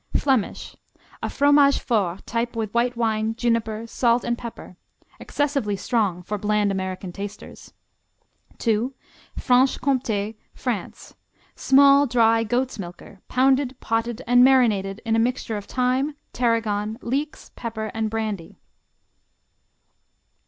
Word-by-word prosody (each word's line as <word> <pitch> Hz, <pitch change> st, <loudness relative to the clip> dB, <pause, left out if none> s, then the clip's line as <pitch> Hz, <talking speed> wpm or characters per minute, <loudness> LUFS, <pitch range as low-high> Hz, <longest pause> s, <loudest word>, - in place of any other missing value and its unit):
Flemish; 260 Hz, -7 st, -1 dB, 0.5 s
a -, -, -2 dB
Fromage 285 Hz, 0 st, +4 dB
Fort 195 Hz, -6 st, -1 dB
type 235 Hz, 0 st, -2 dB
with 220 Hz, -3 st, -3 dB
white 240 Hz, +1 st, +1 dB
wine, 220 Hz, -1 st, 0 dB
juniper, 230 Hz, -2 st, -1 dB
salt 235 Hz, +1 st, +1 dB
and 240 Hz, -, 0 dB
pepper. 235 Hz, -6 st, -9 dB, 0.4 s
Excessively 275 Hz, -8 st, -1 dB
strong 195 Hz, -3 st, -1 dB
for 210 Hz, +3 st, -4 dB
bland 210 Hz, 0 st, +1 dB
American 190 Hz, -1 st, -4 dB
tasters. 200 Hz, +2 st, -9 dB, 0.9 s
II. 230 Hz, +4 st, +1 dB, 0.4 s
Franche 255 Hz, +1 st, +3 dB
Comté, 225 Hz, -6 st, -1 dB, 0.2 s
France; -, -, -5 dB, 0.4 s
small 280 Hz, +1 st, +5 dB
dry 230 Hz, -2 st, +3 dB
goat's 245 Hz, +2 st, -1 dB
milker, 180 Hz, +1 st, -10 dB
pounded, 265 Hz, 0 st, +2 dB
potted 230 Hz, +2 st, -2 dB
and 245 Hz, +1 st, +5 dB
marinated 220 Hz, -6 st, +3 dB
in 225 Hz, 0 st, +1 dB
a -, -, +3 dB
mixture 235 Hz, -1 st, -1 dB
of 205 Hz, -1 st, -5 dB
thyme, 260 Hz, +5 st, 0 dB, 0.2 s
tarragon, 225 Hz, -3 st, 0 dB
leeks, 285 Hz, +5 st, -3 dB
pepper 220 Hz, -2 st, -5 dB
and 220 Hz, -1 st, -1 dB
brandy. 215 Hz, -6 st, -4 dB
230 Hz, 115 wpm, -23 LUFS, 210-250 Hz, 0.9 s, small